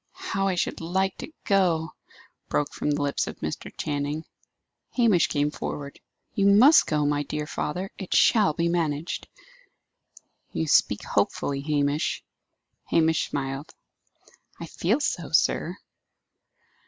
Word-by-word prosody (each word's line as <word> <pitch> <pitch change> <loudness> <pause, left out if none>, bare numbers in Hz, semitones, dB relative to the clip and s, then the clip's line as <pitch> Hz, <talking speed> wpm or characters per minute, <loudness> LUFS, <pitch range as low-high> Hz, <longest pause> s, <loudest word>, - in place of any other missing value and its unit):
"How 195 0 -2
I 190 - +1
should 175 - -2
like 190 +3 0
to - - -8
go!" 175 -5 +2 0.6
broke 145 - 0
from - - -2
the 145 0 0
lips 140 -1 -1
of - - -6
Mr. - - -5
Channing. 145 +2 -2 0.7
Hamish 220 -9 +4
came 145 0 0
forward. 140 -1 -6 0.3
"You 200 -1 +2
must 245 +11 +7
go, 150 -2 +1
my 145 0 +1
dear 150 +1 -4
father! 180 +6 -4
It 190 - -7
shall 210 -8 +5
be 170 +2 0
managed." 165 -2 -1 1.3
"You 160 - -1
speak 105 -8 +3
hopefully, 135 +7 -1
Hamish." 145 0 0 0.6
Hamish 160 -1 +2
smiled. 135 +1 -4 0.8
"I 170 - -5
feel 190 - 0
so, 175 - -2
sir." 170 +3 +2
160 Hz, 130 wpm, -26 LUFS, 145-185 Hz, 1.3 s, must